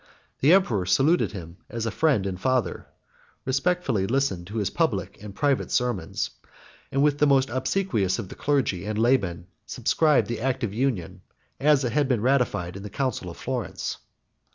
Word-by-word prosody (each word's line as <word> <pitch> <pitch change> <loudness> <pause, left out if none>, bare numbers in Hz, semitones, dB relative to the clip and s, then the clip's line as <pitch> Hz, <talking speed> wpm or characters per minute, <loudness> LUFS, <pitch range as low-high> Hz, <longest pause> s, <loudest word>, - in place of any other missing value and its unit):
The 145 - +4
emperor 115 - +2
saluted 150 - +3
him 85 -3 -8
as 115 -1 -4
a 115 - -1
friend 130 -4 +2
and 95 -2 -4
father; 130 +2 0 0.6
respectfully 135 - 0
listened 110 -8 0
to 105 - -9
his 105 -4 0
public - - -1
and 105 -2 -9
private 140 +1 +1
sermons; 120 -10 -1 0.6
and 135 +1 +2
with 145 -1 +2
the 150 - +4
most 135 -2 +3
obsequious 130 - 0
of 115 -5 -5
the - - -9
clergy 135 -11 0
and 110 0 -2
laymen 105 -8 +1 0.2
subscribed 155 -3 +2
the 115 -2 -4
act 130 0 -1
of 105 -4 -2
union, 115 -7 -2 0.4
as 145 -1 +4
it 120 - -1
had 145 -2 +2
been 125 -5 +1
ratified 120 -9 +1
in 100 - -7
the 105 - -7
council 120 -5 -2
of 85 - -10
Florence. 125 -4 -4
125 Hz, 175 wpm, -25 LUFS, 100-140 Hz, 0.6 s, The